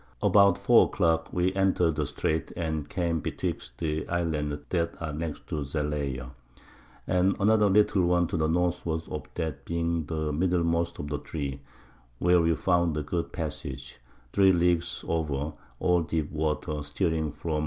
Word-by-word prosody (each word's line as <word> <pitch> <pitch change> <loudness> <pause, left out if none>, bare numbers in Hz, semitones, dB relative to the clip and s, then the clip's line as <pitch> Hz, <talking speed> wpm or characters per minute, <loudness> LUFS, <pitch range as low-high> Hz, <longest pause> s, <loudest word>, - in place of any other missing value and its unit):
About 100 -3 +5
4 - - +6
a - - -5
Clock 80 -1 +1
we 90 +1 +1
enter'd 95 -4 +2
the - - 0
Streight, 80 0 -2
and 80 -3 -2
came 85 -3 0
betwixt - - -4
the 80 -2 -2
Islands 80 -4 -1
that 85 -2 -1
are 75 -2 -4
next 80 0 -5
to - - -2
Zalayer. 70 -3 -3 0.7
And 90 +1 +2
another 105 0 +4
little 100 -2 +4
one 90 0 +3
to - - -2
the 80 -2 +1
Northward 85 -1 0
of 75 -3 -4
that 80 -5 -3
being 85 -2 -1
the 80 -1 -2
middlemost 85 0 +1
of 70 - -5
the 75 -1 -3
three; 70 -2 -5 0.6
where 90 +4 +4
we 85 0 +2
found 85 -2 +1
a 75 - -1
good 85 +3 -3
Passage, 70 -5 -6 0.3
3 95 -1 +6
Leagues 85 -1 +1
over, 75 -2 -1 0.3
all 90 -1 +3
deep 80 -2 -2
Water, 75 0 -2
steering 80 +1 -1
through 75 +2 -3
N. - - 0
80 Hz, 165 wpm, -28 LUFS, 75-90 Hz, 0.7 s, 4